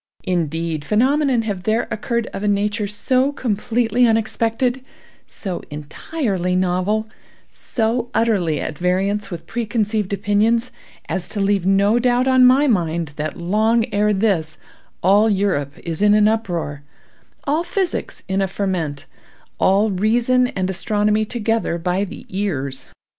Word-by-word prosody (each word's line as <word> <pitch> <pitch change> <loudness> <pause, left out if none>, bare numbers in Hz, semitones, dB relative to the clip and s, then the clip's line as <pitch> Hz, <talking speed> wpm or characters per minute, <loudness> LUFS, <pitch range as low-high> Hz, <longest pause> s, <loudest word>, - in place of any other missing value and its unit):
Indeed, 165 -3 -2
phenomena 255 - +2
have 200 -4 -3
there 220 +4 0
occurred 235 +1 -1
of - - -5
a 210 - -1
nature 205 +1 0
so 255 +6 +1
completely 235 -1 +1
unexpected—so 225 -3 -2
entirely 180 - -3
novel—so 220 +5 -2
utterly 195 -9 +1
at 150 - -5
variance 195 +3 0
with 175 -3 -7
preconceived 215 -3 -1
opinions—as 210 0 -1
to 210 - -4
leave 195 -2 +1
no 200 +4 +3
doubt 250 +1 +2
on 260 -1 +6
my 265 +3 +5
mind 170 - 0
that 155 +1 -3
long 220 +6 +2
ere 210 +1 +2
this 190 -7 0 0.5
all 205 +4 +5
Europe 185 -9 0
is 165 0 -2
in 210 0 +5
an 210 0 +5
uproar, 175 -10 -2 0.6
all 305 +4 0
physics 370 +1 -2
in 190 +1 0
a 195 - +1
ferment, 175 -7 -3 0.5
all 205 +3 +3
reason 235 +6 +2
and 185 -6 -2
astronomy 210 +3 +1
together 225 -5 -1
by 180 +3 -1
the 200 - -8
ears. 145 -10 -3
205 Hz, 125 wpm, -20 LUFS, 180-230 Hz, 0.6 s, on